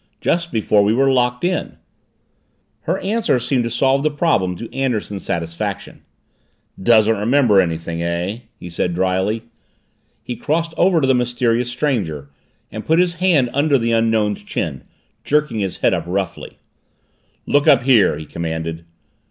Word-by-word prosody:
"Just 170 0 -1
before 105 -2 +2
we 105 +2 +2
were 135 +1 +3
locked 125 0 +1
in." 180 +1 -2 1.1
Her 180 - +1
answer 215 - +1
seemed 125 +1 0
to - - -2
solve 135 +3 +2
the 155 - +1
problem 145 - 0
to 115 +5 -9
Anderson's 115 -7 -2
satisfaction. 85 -1 -4 0.8
"Doesn't 110 +1 +4
remember 115 -2 +4
anything, 85 -1 -3
eh?" 85 +5 -2 0.2
he - - -10
said 85 0 -2
dryly. 95 +4 0 0.8
He 125 - -5
crossed 165 +4 -1
over 175 -2 +3
to - - +2
the 130 - +4
mysterious 120 -1 0
stranger 100 - -2 0.4
and 110 0 -6
put 160 - +2
his 180 0 +2
hand 150 -10 +3
under 145 0 +3
the 115 -1 -1
Unknown's 110 -2 +1
chin, - - -4 0.4
jerking 150 -6 0
his 95 -3 -3
head - - +4
up - - -2
roughly. 95 0 -4 0.9
"Look 145 0 +2
up 125 -3 +5
here!" 120 -7 +4
he 80 - -8
commanded. 80 0 -5
115 Hz, 150 wpm, -19 LUFS, 95-140 Hz, 1.1 s, up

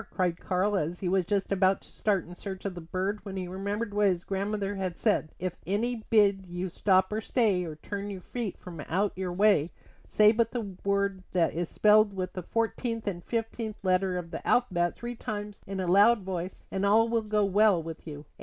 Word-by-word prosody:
cried 180 -3 0
Karl; 190 +3 0
and 175 -2 -1
he 185 - -3
was 185 0 +2
just 200 0 0
about 190 0 +3
to - - -20
start 200 -4 0
in 175 - -10
search 190 +1 -7
of 195 - -2
the 175 - -8
bird 185 +5 -2
when 195 -2 -6
he 185 -1 -3
remembered 200 +4 -3
what 205 0 +3
his 180 -2 0
grandmother 200 +1 -2
had 185 -3 -3
said: 205 -8 +1
"If 180 0 -3
any 225 +4 -1
bid 200 -4 +4
you 180 +1 -4
stop 185 +2 +2
or 215 - -1
stay, 210 -6 +1
or 160 -2 -6
turn 200 +6 -5
your 195 -2 -6
feet 230 0 -4
from 175 -3 -10
out 195 +4 0
your 185 -1 -3
way, 190 -4 +3 0.4
say 210 0 +5
but 230 0 +1
the 210 -6 -4
word 200 -1 0
that 175 -3 +2
is 170 0 -2
spelled 210 -1 +4
with 185 -1 -3
the 185 - -4
fourteenth 230 +3 -2
and 175 -4 -3
fifteenth 225 -1 -3
letters 185 0 +2
of 170 -2 -6
the 165 - -6
alphabet 175 -8 +2
three 240 0 -5
times 210 -2 -5
in 195 0 -4
a 185 - -1
loud 205 +5 +5
voice, 185 -1 -5
and 190 - -2
all 215 +3 +5
will 230 0 +1
go 210 -1 +1
well 200 -3 +4
with 165 0 -8
you." 145 -1 -8
195 Hz, 215 wpm, -28 LUFS, 180-210 Hz, 0.4 s, say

